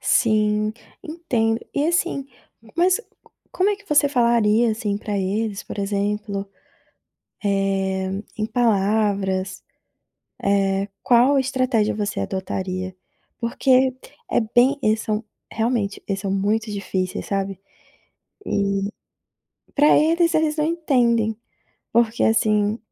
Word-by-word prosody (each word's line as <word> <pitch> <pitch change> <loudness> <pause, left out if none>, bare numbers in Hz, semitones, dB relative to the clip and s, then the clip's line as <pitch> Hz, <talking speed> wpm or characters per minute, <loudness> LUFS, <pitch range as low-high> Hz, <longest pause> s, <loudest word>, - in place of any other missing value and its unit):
Sim, 215 -2 +2 0.3
entendo 245 -9 -1 0.2
e 285 - +1
assim, 340 -5 0 0.5
mas, 360 +2 +4
c 470 - -10 0.5
como 380 +3 +2
é 410 - -1
que 405 0 -22
você 290 -1 +4
falaria 235 -3 +3
assim, 210 -2 -2
pra 210 -1 -3
eles 200 +2 -2
por - - -9
exemplo, 200 0 -2 1.0
eh, 195 -1 0 0.3
em 215 - 0
palavras, 200 -4 0 0.8
eh, 195 0 +1
qual 250 +3 +4
a - - +4
estratégia 255 -5 +1
você 210 0 -2
adotaria? 185 -1 -4 0.4
Porque 255 +2 +2 0.4
é - - +3
bem 245 +5 +3
eles 215 -1 +2
são, 215 0 -2 0.3
realmente, 220 -3 -1
eles 195 -1 -1
são 195 -1 -3
muito 210 +3 0
difíceis, 190 -2 -3
sabe, 195 -1 -2 0.9
e 200 0 0 0.9
pra 295 +1 +5
eles, 335 +2 +3
eles 315 -1 +2
não 300 - +1
entendem. 245 -9 +1 0.6
Porque 235 0 +2
assim, 215 -1 +2
215 Hz, 115 wpm, -22 LUFS, 200-255 Hz, 1.0 s, pra